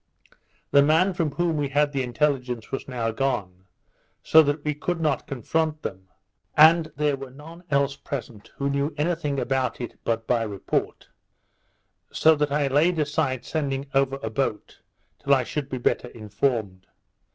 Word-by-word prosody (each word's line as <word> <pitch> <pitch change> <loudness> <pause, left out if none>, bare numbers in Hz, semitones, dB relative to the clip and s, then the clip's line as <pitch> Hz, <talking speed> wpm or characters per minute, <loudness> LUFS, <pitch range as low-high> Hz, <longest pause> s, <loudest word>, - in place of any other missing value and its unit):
The 140 - +7
man 160 +6 +3
from 160 -5 -1
whom 165 +1 0
we 145 -2 -1
had 145 +1 +2
the 135 -2 -1
intelligence 125 -2 -1
was 135 - -4
now 120 -3 -2
gone, 100 -7 -2 0.6
so 160 - +7
that 145 0 -1
we 150 - +1
could 170 +4 -3
not 155 -2 0
confront 155 +4 -1
them, 95 0 -6 0.5
and 160 +1 +6
there 145 0 +1
were 135 -1 -8
none 160 +6 -13
else 140 -1 +1
present 120 -6 -7
who 140 - -2
knew 140 +2 -1
any 160 +4 +1
thing 150 -4 -2
about 130 -3 -1
it 120 - -7
but 115 -1 -1
by 120 -1 +1
report; 105 -3 -3 1.0
so 160 - +5
that 150 -1 0
I 145 0 +1
laid 155 +6 +2
aside 145 -4 -1
sending 140 -3 -2
over 135 0 +2
a 110 - -3
boat 110 -2 -3 0.4
till 140 0 +3
I 130 - +1
should 140 +2 -4
be 130 - -3
better 120 - 0
informed. 105 -3 -2
140 Hz, 165 wpm, -25 LUFS, 125-150 Hz, 1.0 s, The